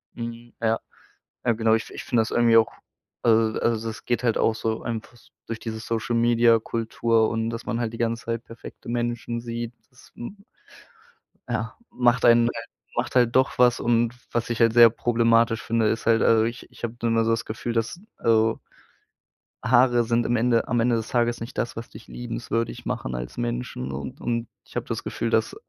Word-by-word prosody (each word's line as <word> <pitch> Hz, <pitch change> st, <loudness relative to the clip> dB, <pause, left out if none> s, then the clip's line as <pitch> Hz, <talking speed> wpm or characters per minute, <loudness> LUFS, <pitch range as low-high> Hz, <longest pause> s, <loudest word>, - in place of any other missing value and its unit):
Mhm. 115 Hz, 0 st, -7 dB
Ja, 115 Hz, 0 st, +1 dB, 0.7 s
ja, 120 Hz, -, +4 dB
genau. 110 Hz, 0 st, +2 dB
Ich 110 Hz, -, -3 dB
ich -, -, -7 dB
finde 120 Hz, -2 st, +2 dB
das 110 Hz, -, -3 dB
irgendwie 115 Hz, -1 st, +5 dB
auch 115 Hz, -, +4 dB, 0.5 s
also 110 Hz, -1 st, +3 dB
also, 115 Hz, -1 st, 0 dB
das 110 Hz, -2 st, -7 dB
geht 120 Hz, +1 st, 0 dB
halt 115 Hz, -2 st, +2 dB
auch 115 Hz, -, +2 dB
so 110 Hz, 0 st, -3 dB
einfach 115 Hz, +1 st, -5 dB, 0.3 s
durch 115 Hz, -1 st, -4 dB
diese 110 Hz, -1 st, -5 dB
Social-Media-Kultur 115 Hz, 0 st, +2 dB
und, 115 Hz, 0 st, -1 dB
dass 115 Hz, 0 st, -6 dB
man 120 Hz, -, -2 dB
halt 115 Hz, -2 st, -1 dB
die 115 Hz, -, -6 dB
ganze 115 Hz, 0 st, -1 dB
Zeit 115 Hz, 0 st, -3 dB
perfekte 115 Hz, -1 st, -12 dB
Menschen 120 Hz, 0 st, -2 dB
sieht, 115 Hz, 0 st, -5 dB, 0.2 s
das, 125 Hz, -, -20 dB
hm, 200 Hz, -, -9 dB, 1.0 s
ja, 115 Hz, 0 st, -3 dB
macht 120 Hz, -1 st, +2 dB
einen 120 Hz, 0 st, +6 dB
halt 115 Hz, 0 st, -6 dB, 0.3 s
macht 120 Hz, +2 st, -2 dB
halt 120 Hz, -2 st, +4 dB
doch 130 Hz, +1 st, +2 dB
was. 125 Hz, 0 st, +4 dB
Und, 120 Hz, 0 st, +2 dB, 0.2 s
was 120 Hz, 0 st, -1 dB
ich 120 Hz, -, -2 dB
halt 115 Hz, -1 st, +5 dB
sehr 120 Hz, -1 st, +9 dB
problematisch 115 Hz, 0 st, +2 dB
finde, 115 Hz, -1 st, +1 dB
ist 115 Hz, -, -2 dB
halt, 115 Hz, 0 st, +4 dB
also, 110 Hz, -1 st, +4 dB
ich 115 Hz, +1 st, -5 dB
ich -, -, -11 dB
habe 115 Hz, 0 st, -3 dB
dann 115 Hz, -1 st, +1 dB
da 115 Hz, -, +3 dB
so 115 Hz, -, +1 dB
das 115 Hz, -1 st, 0 dB
Gefühl, 115 Hz, +2 st, -4 dB
dass, 115 Hz, +9 st, -2 dB, 0.2 s
also 115 Hz, 0 st, +2 dB, 1.0 s
Haare 120 Hz, -1 st, +4 dB
sind 120 Hz, +1 st, +1 dB
im 120 Hz, -, +1 dB
Ende 115 Hz, 0 st, +2 dB
am 120 Hz, +1 st, +1 dB
Ende 120 Hz, +1 st, +3 dB
des 115 Hz, -1 st, -3 dB
Tages 120 Hz, -1 st, +1 dB
nicht 115 Hz, +2 st, -7 dB
das, 120 Hz, -, -2 dB
was 115 Hz, +1 st, -7 dB
dich -, -, -13 dB
liebenswürdig 115 Hz, -1 st, -4 dB
machen 60 Hz, -, -3 dB
als -, -, -6 dB
Menschen 120 Hz, -, -3 dB
und 70 Hz, +1 st, -6 dB
und 115 Hz, -1 st, -2 dB, 0.2 s
ich -, -, -19 dB
habe -, -, -2 dB
das -, -, -4 dB
Gefühl, -, -, -3 dB
dass -, -, +1 dB
115 Hz, 195 wpm, -25 LUFS, 115-120 Hz, 1.0 s, sehr